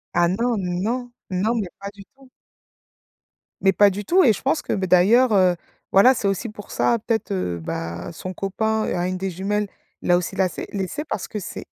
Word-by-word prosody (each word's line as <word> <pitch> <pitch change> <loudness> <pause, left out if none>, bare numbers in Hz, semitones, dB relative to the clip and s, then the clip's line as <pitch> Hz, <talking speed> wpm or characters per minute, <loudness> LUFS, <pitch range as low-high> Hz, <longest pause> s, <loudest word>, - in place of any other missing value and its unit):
Ah 175 0 +4
non, 230 +6 0 0.3
non, 245 +3 -2 0.2
non 205 +6 +1
mais 195 - -3
pas 200 0 -6
du 205 -1 -13
tout. 270 -1 -19 1.3
Mais 195 -1 +4
pas 205 -1 +6
du 200 +2 -5
tout 370 +2 +4
et 230 - +6
je - - -7
pense 160 - +1
que, - - -3
beh, 190 -1 -1
d'ailleurs, 215 +8 +5
heu, 185 -3 +4 0.4
voilà, 220 +7 +7
c'est 220 -5 -2
aussi 195 +4 -1
pour 210 -1 -11
ça 235 - +2
peut-être, 220 -2 -1
heu, 90 - -2
bah, 85 +1 -5
son 185 +3 -6
copain 220 +4 -1
a 175 0 -1
une 185 0 -2
des 190 +1 -2
jumelles, 205 +3 -1 0.3
il - - -6
l'a 175 - +6
aussi 180 - -3
lacer 185 -1 -1
laissé 195 +9 -3
parce 200 - -4
que 210 - -5
c'est 190 - -7
195 Hz, 210 wpm, -22 LUFS, 185-220 Hz, 1.3 s, voilà